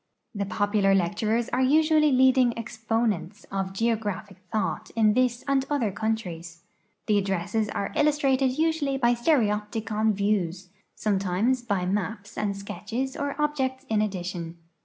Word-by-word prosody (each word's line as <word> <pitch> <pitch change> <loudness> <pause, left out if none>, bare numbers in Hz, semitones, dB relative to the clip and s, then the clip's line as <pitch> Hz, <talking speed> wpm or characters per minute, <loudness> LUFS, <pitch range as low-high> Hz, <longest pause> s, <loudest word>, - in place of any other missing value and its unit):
The 200 -2 -3
popular 200 0 +2
lecturers 210 +6 0
are 255 - 0
usually 305 +2 +4
leading 260 -1 +4
expo 225 0 -2
nents 195 0 -3
of 195 -1 -2
geographic 210 -2 -2
thought 190 -8 -2
in 215 -2 +4
this 250 0 +1
and 275 -1 +2
other 260 -8 0
countries. 180 -6 -4 0.4
'I'he 210 -1 +4
addresses 195 +3 -1
are 200 - -3
illustrated 275 -3 +2
usually 315 -4 +1
by 240 -2 +3
stereopticon 220 -4 +1
vicAvs, 190 -3 -1 0.3
.some 205 -3 0
times 200 +7 +1
by 200 -6 -1
maps 205 +2 -3
ami 200 -2 -1
sketches 230 +6 -4
or 285 0 -3
objects 270 -3 -1
in 215 -1 +2
addition. 175 -4 -4
220 Hz, 135 wpm, -26 LUFS, 195-260 Hz, 0.4 s, usually